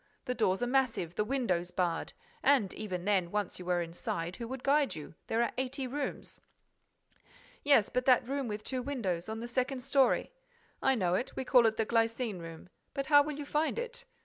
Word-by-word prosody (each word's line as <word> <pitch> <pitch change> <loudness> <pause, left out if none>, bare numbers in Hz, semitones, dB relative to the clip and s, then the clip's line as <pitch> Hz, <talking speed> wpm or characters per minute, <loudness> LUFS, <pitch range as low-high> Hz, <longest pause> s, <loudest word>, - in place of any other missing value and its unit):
The 250 - -1
doors 215 -2 +1
are - - +1
massive, 245 -10 +1
the 210 - 0
windows 210 -8 0
barred. 175 -2 -1 0.3
And, 260 -8 +3
even 185 -4 -4
then, 190 -4 +2
once 205 -1 -2
you 180 - -8
were 175 -1 +1
inside, 170 +1 -4
who 235 - -5
would 260 +1 -6
guide 285 0 +3
you? 155 -1 -8
There 230 +1 +2
are 235 - -1
eighty 265 +1 -2
rooms." 280 +3 -5 1.2
"Yes, 280 -8 +5
but 250 0 -1
that 250 -2 +5
room 275 -1 -2
with 210 -1 -4
two 260 +2 -3
windows, 215 -10 -2
on 220 +1 -4
the 235 - -4
second 255 +2 -1
story—" 270 - +2 0.5
"I 265 0 +3
know 180 -6 +1
it, 240 +7 -1
we 265 - -3
call 245 -2 +6
it 220 0 0
the 225 - +2
glycine 230 -2 0
room. 165 +1 -9 0.3
But 275 - -1
how 290 0 +7
will 295 0 -3
you 295 - -5
find 300 +6 0
it? 485 0 -5
235 Hz, 200 wpm, -31 LUFS, 185-270 Hz, 1.2 s, how